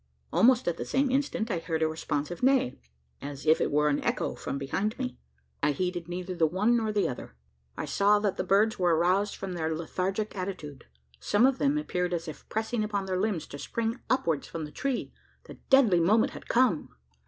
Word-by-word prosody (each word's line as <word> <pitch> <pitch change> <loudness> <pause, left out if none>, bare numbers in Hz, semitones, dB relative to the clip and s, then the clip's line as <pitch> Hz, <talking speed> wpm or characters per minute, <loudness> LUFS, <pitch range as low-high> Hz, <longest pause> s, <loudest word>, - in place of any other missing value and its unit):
Almost 225 +7 +4
at 170 -1 0
the - - -3
same 270 0 +1
instant, 265 -4 0
I 175 - 0
heard 165 -1 -1
a - - +3
responsive 155 +1 -3
neigh, 260 - +2 0.4
as 140 +1 -7
if 155 +1 +4
it - - +1
were 150 +1 +3
an 145 -1 +1
echo - - -1
from - - -5
behind 195 - -2
me. 255 -1 -4 0.4
I 145 0 +2
heeded 175 +1 -2
neither 180 +1 -4
the 165 -2 +2
one 205 +9 +2
nor 220 -2 0
the 210 -1 +1
other. 125 - -7 0.4
I - - -3
saw 200 +8 +3
that 205 -2 0
the - - -2
birds 210 +4 +2
were 175 -2 +3
aroused 185 +5 +2
from 195 -2 -5
their 160 -2 -1
lethargic 190 +6 -2
attitude. 180 -7 -6 0.3
Some 205 - +3
of 265 -1 +2
them 285 +1 +2
appeared 180 -12 -1
as 165 0 -5
if 155 - -9
pressing 220 +1 -1
upon 205 -2 -2
their 185 -1 -1
limbs 205 -6 -1
to 145 - -8
spring 230 - -2
upwards 165 - +1
from 160 -2 -5
the 150 - -10
tree. 270 - -3 0.3
The - - -12
deadly 245 -10 +6
moment 210 +7 +3
had - - -10
come! 240 -10 +2
185 Hz, 205 wpm, -28 LUFS, 160-220 Hz, 0.4 s, deadly